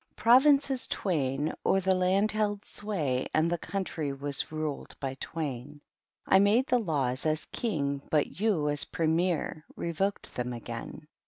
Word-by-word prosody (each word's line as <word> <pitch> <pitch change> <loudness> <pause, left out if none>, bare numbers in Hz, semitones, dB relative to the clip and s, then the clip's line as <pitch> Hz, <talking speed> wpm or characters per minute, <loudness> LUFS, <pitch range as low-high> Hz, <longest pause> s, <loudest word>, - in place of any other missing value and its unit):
'Provinces 270 +2 +4
twain 145 -5 -1
o'er 195 - +3
the 190 0 +2
land 185 +3 +2
held 210 -1 -1
sway, 155 -12 -2
and 160 +2 +2
the 175 - +1
country 170 -7 -3
was 140 +1 -2
ruled 155 -2 -4
by 135 -2 -3
twain, 145 -2 -5 0.5
I 190 - +5
made 210 +6 +4
the 255 -4 +2
laws, 140 - 0
as 155 0 0
King, 140 - -2
but 150 +1 0
you, 210 -6 +2
€U 145 0 +2
Premier, 165 -1 0
revoked 190 +4 -2
them 125 0 -3
again. 120 +5 -7
160 Hz, 145 wpm, -29 LUFS, 145-200 Hz, 0.5 s, I